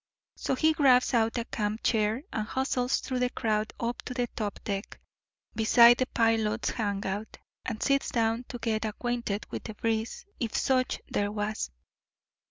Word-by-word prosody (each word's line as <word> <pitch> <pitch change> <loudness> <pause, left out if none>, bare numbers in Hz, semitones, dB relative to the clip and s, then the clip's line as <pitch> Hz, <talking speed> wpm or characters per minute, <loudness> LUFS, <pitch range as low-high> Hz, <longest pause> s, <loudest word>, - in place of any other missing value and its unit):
So - - -1
he 315 +4 +3
grabs 265 -5 +4
out 225 0 +2
a 235 - -1
camp 215 -1 -3
chair 220 +3 +1
and 215 -1 -2
hustles 260 -1 0
through 255 -1 -2
the 250 0 +2
crowd 215 -3 -1
up 235 +1 -2
to 250 - -5
the 245 -1 +1
top 210 -3 -3
deck, 200 0 -4 0.5
beside 235 +2 +6
the 255 - +1
pilot's 225 -1 +1
hangout, 205 -1 -3 0.3
and 220 - -3
sits 275 -1 +2
down 230 +1 0
to 245 - -7
get 225 -2 -1
acquainted 220 -1 -2
with - - -5
the 220 - -6
breeze, 225 - -2
if 230 -3 -1
such 255 -2 +1
there 205 0 -1
was. 210 - -2
230 Hz, 165 wpm, -29 LUFS, 215-250 Hz, 0.5 s, beside